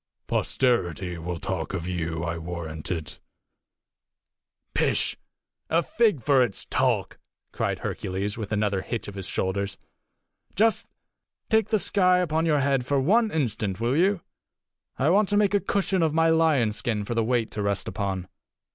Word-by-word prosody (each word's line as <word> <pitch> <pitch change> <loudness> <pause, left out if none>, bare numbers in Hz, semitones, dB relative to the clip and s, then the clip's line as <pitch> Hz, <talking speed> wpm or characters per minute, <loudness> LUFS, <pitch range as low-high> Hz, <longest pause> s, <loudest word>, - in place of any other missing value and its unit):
Posterity 90 - 0
will 85 +1 -4
talk 95 0 -3
of 85 -3 -4
you, 85 -2 -2
I 85 -1 -2
warrant 80 -2 -5
it." 80 -4 -4 1.5
"Pish! - - +1 0.5
a 165 +2 +3
fig 210 - +1
for 135 0 +4
its 120 -6 -1
talk!" - - 0 0.3
cried - - -1
Hercules, 95 +2 -3
with 110 -3 -6
another 105 -2 +1
hitch 115 +3 -4
of 100 - -7
his 95 -2 -6
shoulders. 100 +1 -2 0.8
"Just 220 +3 +2 0.6
take 220 -2 +4
the 215 - +3
sky 185 -2 +3
upon 165 -2 +1
your 150 -3 +3
head 135 -2 +1
one 185 - +3
instant, 110 - -1
will 120 +3 +1
you? 185 +3 +2 0.8
I 145 +5 +3
want 200 +1 +3
to 205 - +2
make 205 -1 +3
a 205 - +4
cushion 195 -2 0
of 160 -2 +1
my 165 0 +4
lion's 150 -10 +3
skin 105 -3 -1
for 120 - -3
the 115 -1 +1
weight 115 -1 0
to 105 - -4
rest 100 -1 -1
upon. 95 -3 -3
115 Hz, 155 wpm, -26 LUFS, -, 1.5 s, for